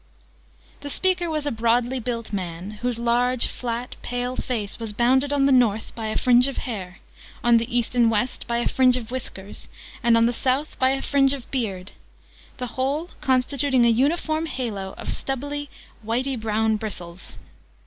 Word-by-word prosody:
The 285 Hz, -, -7 dB
speaker 365 Hz, +2 st, +1 dB
was 305 Hz, -2 st, -2 dB
a 290 Hz, -, 0 dB
broadly 235 Hz, +3 st, +1 dB
built 230 Hz, -2 st, -4 dB
man, 180 Hz, 0 st, -4 dB
whose 245 Hz, -1 st, 0 dB
large, 240 Hz, +1 st, +2 dB
flat, 240 Hz, 0 st, -4 dB
pale 245 Hz, +1 st, -3 dB
face 220 Hz, -6 st, -3 dB
was 225 Hz, -2 st, -4 dB
bounded 260 Hz, +5 st, +3 dB
on 280 Hz, -1 st, +3 dB
the 275 Hz, -, +4 dB
North 230 Hz, -4 st, +3 dB
by 225 Hz, -1 st, -4 dB
a 215 Hz, -, -1 dB
fringe 250 Hz, +1 st, +5 dB
of 275 Hz, -, -4 dB
hair, 190 Hz, -7 st, -5 dB, 0.5 s
on 240 Hz, -1 st, +6 dB
the 235 Hz, +1 st, -1 dB
East 240 Hz, 0 st, -1 dB
and 240 Hz, -2 st, +4 dB
West 225 Hz, +3 st, -1 dB
by 235 Hz, -, 0 dB
a 240 Hz, -, +1 dB
fringe 255 Hz, -1 st, +4 dB
of 240 Hz, -2 st, -7 dB
whisker, 205 Hz, -6 st, -6 dB, 0.5 s
and 235 Hz, -3 st, +4 dB
on 230 Hz, -, +5 dB
the 240 Hz, -, +2 dB
South 265 Hz, +5 st, 0 dB
by 260 Hz, -, +4 dB
a 270 Hz, 0 st, 0 dB
fringe 275 Hz, -1 st, +3 dB
of 265 Hz, -4 st, -6 dB
beard 200 Hz, -8 st, -3 dB, 0.7 s
the 250 Hz, -, -3 dB, 0.2 s
whole 295 Hz, +6 st, -1 dB
constituting 260 Hz, -1 st, +2 dB
a -, -, +5 dB
uniform 310 Hz, +6 st, +1 dB
halo 210 Hz, -9 st, -4 dB
of -, -, -8 dB
stubbly 285 Hz, +2 st, -2 dB, 0.3 s
whitey 250 Hz, +5 st, -1 dB
brown 220 Hz, -1 st, +1 dB
bristles. 185 Hz, -4 st, -7 dB
245 Hz, 175 wpm, -24 LUFS, 225-265 Hz, 0.7 s, on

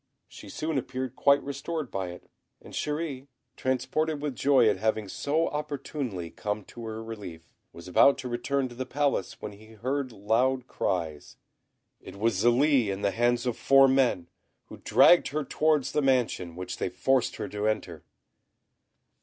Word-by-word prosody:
She -, -, -12 dB
soon 155 Hz, -2 st, -2 dB
appeared 130 Hz, 0 st, -5 dB
quite 140 Hz, 0 st, +4 dB
restored 140 Hz, +1 st, -4 dB
by 95 Hz, -2 st, -3 dB
it; 90 Hz, 0 st, -10 dB, 0.3 s
and -, -, -14 dB
Chéri, 150 Hz, -3 st, -3 dB, 0.3 s
transported 145 Hz, +4 st, -1 dB
with 145 Hz, -3 st, -3 dB
joy 135 Hz, -4 st, +4 dB
at 105 Hz, -3 st, +2 dB
having 110 Hz, 0 st, -1 dB
so 150 Hz, -, 0 dB
opportunely 140 Hz, -, -4 dB
come 105 Hz, 0 st, -4 dB
to 115 Hz, +4 st, -10 dB
her 110 Hz, 0 st, -5 dB
relief, 100 Hz, -8 st, -9 dB, 0.2 s
was 85 Hz, -, -12 dB
about 115 Hz, +9 st, +5 dB
to 130 Hz, -, -6 dB
return 130 Hz, +3 st, -1 dB
to -, -, -11 dB
the 130 Hz, +1 st, -5 dB
Palace 140 Hz, -8 st, -1 dB
when 105 Hz, -, -4 dB
he 110 Hz, +2 st, -15 dB
heard 130 Hz, +4 st, -2 dB
loud 120 Hz, +5 st, +1 dB
cries. 80 Hz, -, -3 dB, 0.6 s
It -, -, -11 dB
was 105 Hz, -1 st, 0 dB
Zélie 125 Hz, 0 st, +4 dB
in 100 Hz, 0 st, -3 dB
the 100 Hz, -, +2 dB
hands 120 Hz, +2 st, +1 dB
of 125 Hz, -3 st, -1 dB
four 135 Hz, 0 st, +5 dB
men, 130 Hz, -10 st, +2 dB, 0.4 s
who -, -, -10 dB
dragged 175 Hz, -, +5 dB
her 150 Hz, +2 st, -2 dB
towards 155 Hz, -1 st, +1 dB
the 150 Hz, -, +1 dB
mansion, 125 Hz, -, +1 dB
which 90 Hz, 0 st, -6 dB
they -, -, -2 dB
forced 125 Hz, +7 st, +1 dB
her 105 Hz, -, -4 dB
to 105 Hz, +1 st, -2 dB
enter. 90 Hz, -7 st, -3 dB
125 Hz, 165 wpm, -28 LUFS, 105-140 Hz, 0.6 s, about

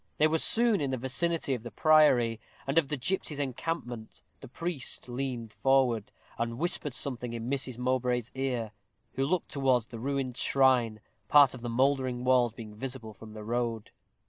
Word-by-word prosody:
They 150 Hz, -, +4 dB
were 160 Hz, +1 st, +2 dB
soon 230 Hz, -1 st, +4 dB
in 140 Hz, -, -1 dB
the 130 Hz, -, -1 dB
vicinity 140 Hz, +4 st, 0 dB
of 125 Hz, -, -3 dB
the 120 Hz, -, -7 dB
priory, 125 Hz, -4 st, +4 dB, 0.3 s
and 135 Hz, +4 st, +3 dB
of 155 Hz, -, -2 dB
the 150 Hz, -, -2 dB
gipsies' 150 Hz, +1 st, -1 dB
encampment. 130 Hz, -4 st, -4 dB, 0.2 s
The 135 Hz, -, -11 dB
priest 145 Hz, 0 st, -4 dB
leaned 120 Hz, -3 st, -4 dB
forward, 130 Hz, -5 st, +2 dB, 0.3 s
and 115 Hz, 0 st, -2 dB
whispered 150 Hz, -3 st, -1 dB
something 125 Hz, -3 st, -2 dB
in 115 Hz, 0 st, -5 dB
Mrs. 130 Hz, -3 st, -1 dB
Mowbray's 125 Hz, -1 st, -1 dB
ear, 125 Hz, -5 st, -2 dB, 0.4 s
who 135 Hz, -, -1 dB
looked 180 Hz, +2 st, -1 dB
towards 130 Hz, -5 st, +1 dB
the 115 Hz, -, -9 dB
ruined 135 Hz, -1 st, -2 dB
shrine, 125 Hz, -5 st, +2 dB, 0.3 s
part 145 Hz, -3 st, +6 dB
of 125 Hz, -, -9 dB
the 120 Hz, -, -4 dB
mouldering 130 Hz, 0 st, +1 dB
walls 125 Hz, -3 st, +3 dB
being 110 Hz, -2 st, -9 dB
visible 115 Hz, -1 st, -6 dB
from 110 Hz, +1 st, -12 dB
the 105 Hz, -, -7 dB
road. 115 Hz, -1 st, -2 dB
130 Hz, 170 wpm, -29 LUFS, 115-140 Hz, 0.4 s, part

